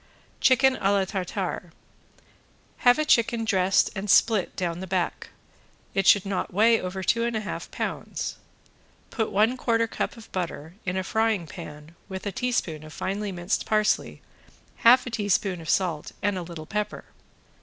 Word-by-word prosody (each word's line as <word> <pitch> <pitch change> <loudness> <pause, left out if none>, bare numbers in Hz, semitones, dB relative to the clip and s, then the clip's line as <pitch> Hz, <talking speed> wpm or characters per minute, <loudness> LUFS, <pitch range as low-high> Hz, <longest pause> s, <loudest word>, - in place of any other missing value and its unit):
~CHICKEN 260 0 +4
A 195 - +1
LA 195 -1 +2
TARTARE~ 185 -2 -4 1.1
Have 245 +2 +5
a 305 - +1
chicken 235 -5 +3
dressed 190 -3 +3
and 200 +1 -4
split 215 -2 +4
down 175 -2 -2
the 190 - -6
back; 180 -1 -2 0.6
it 195 -1 +1
should 200 -2 +6
not 195 -1 -2
weigh 225 +4 +4
over 185 +1 -4
two 230 +5 +2
and 235 -1 -1
a 220 - -1
half 210 - -6
pounds. - - -4 0.7
Put 220 - -1
one 220 +6 +3
quarter 230 -2 +1
cup 230 - -4
of 225 - -13
butter 170 -3 -4
in 180 +1 -1
a 190 - -1
frying 220 -2 +1
pan 150 +1 -10
with 190 +1 -6
a 205 - -1
teaspoon 185 -10 -2
of 155 - -11
finely 200 +2 -3
minced 175 +2 -2
parsley, 215 -1 +1 0.5
half 245 +2 +6
a 250 - -5
teaspoon 205 -4 0
of 160 - -8
salt 170 -6 0
and 205 0 +1
a 185 - -3
little 170 -2 -8
pepper. 210 +5 -3
195 Hz, 165 wpm, -26 LUFS, 180-225 Hz, 1.1 s, should